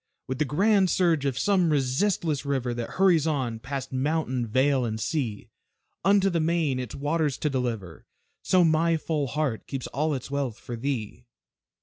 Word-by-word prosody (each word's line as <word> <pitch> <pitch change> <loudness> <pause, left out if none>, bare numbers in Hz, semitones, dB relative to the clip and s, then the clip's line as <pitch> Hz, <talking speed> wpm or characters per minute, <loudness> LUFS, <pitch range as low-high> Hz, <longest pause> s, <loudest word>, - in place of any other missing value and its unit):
With 130 +1 -4
the 150 - +2
grand 190 +6 +3
surge 165 -5 +2
of 135 -3 -1
some 185 -2 +2
resistless 150 +2 0
river, 135 -4 -1
That 120 -1 -5
hurries 175 -5 +4
on, 130 -7 -1
past 135 +2 -5
mountain, 130 -3 -1
vale, 130 +3 +2
and 110 -2 -2
sea, 115 -6 -3 0.5
Unto 195 0 +4
the 170 - +1
main, 160 -5 +1
its 125 -3 -5
waters 145 -1 0
to 150 - -1
deliver, 115 - -4 0.3
So 185 -2 +3
my 165 0 +3
full 150 -3 -2
heart 140 -5 -2
keeps 135 -2 -4
all 150 +2 -1
its 130 +1 -7
wealth 135 -5 -2
for 120 - -7
thee. 120 -2 -4
140 Hz, 165 wpm, -26 LUFS, 125-160 Hz, 0.5 s, hurries